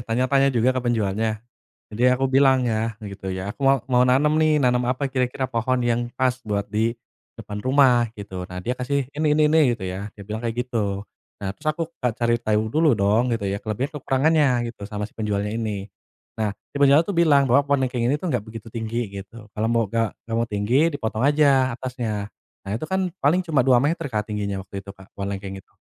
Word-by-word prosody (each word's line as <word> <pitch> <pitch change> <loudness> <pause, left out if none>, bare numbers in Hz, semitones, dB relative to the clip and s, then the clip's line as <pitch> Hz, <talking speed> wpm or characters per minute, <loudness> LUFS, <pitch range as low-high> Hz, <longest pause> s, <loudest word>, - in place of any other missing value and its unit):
tanya-tanya 130 +4 +2
juga, 125 0 +2
ke 130 - -1
penjualnya. 110 -2 0 0.6
Jadi 110 +3 -3
aku 135 +1 -1
bilang, 130 -1 +4
ya, 110 -1 -1 0.2
gitu 95 0 -7
ya, 95 +2 -4
"Aku - - -34
mau 135 0 +6 0.2
mau 125 0 +5
nanam, 140 +4 +3
nih. 155 -1 +4
Nanam 125 -3 +2
apa 130 +3 -1
kira-kira, 130 0 -1
pohon 120 +3 +1
yang 120 0 0
pas, 130 -1 +1
buat 100 -1 0
di 115 +2 0 0.4
depan 105 0 -7
rumah?" 130 -2 +4
gitu. 95 -3 -7
Nah, 90 - -8
dia 125 - 0
kasih, 130 +2 -1
"Ini 155 +1 -1
ini 155 - +4
ini," 160 - +5 0.2
gitu 100 - -7
ya. 95 +2 -4
Dia 100 - -10
bilang 110 +2 -5
kayak 115 -1 -3
gitu. 100 -5 -2 0.4
Nah, 100 - -3
terus 150 +9 -15
aku 170 - -2 0.2
kayak 125 -3 0
cari 120 -1 +2
tahu 110 -2 +1
dulu, 160 +1 +3
dong, 105 +4 +3
gitu 100 - -6
ya. 100 +1 -2
Kelebihan 110 +6 -3
kekurangannya, 145 +3 +3 0.2
gitu, 115 - -39
sama 105 -1 -4
si 105 - -9
penjualnya 105 -1 -2
ini. 105 -3 -4 0.5
Nah, 105 -2 -1 0.2
si - - -9
penjualnya 140 +3 +6
tuh 200 -1 -4
bilang, 145 -4 +5
bahwa 140 +3 +3
pohon 140 -2 +2
lengkeng 125 -1 -2
ini 140 - +2
tuh 165 +1 -3
nggak 125 - +1
begitu 115 0 -10
tinggi, 115 -2 -3
gitu. 100 +3 -9
"Kalau 110 +1 -1
mau 115 0 +2
gak 115 -2 0
nggak 115 0 -3
mau 115 - -1
tinggi, 115 +10 +2
dipotong 115 -8 -3
aja 135 -2 +3
atasnya." 115 -5 -4 0.3
Nah, 95 - -6
itu 135 - -5
kan, 190 -1 -1
paling 170 +7 +2
cuma 155 -6 +2
2 125 0 +4
meter, 165 +3 0
Kak, 105 -4 -2
tingginya 100 -1 -2
waktu 100 +1 -7
itu 95 - -20
Kak, 95 0 -16
pohon 100 0 -5
lengkeng 95 0 -7
itu. - - -32
120 Hz, 215 wpm, -23 LUFS, 105-135 Hz, 0.6 s, mau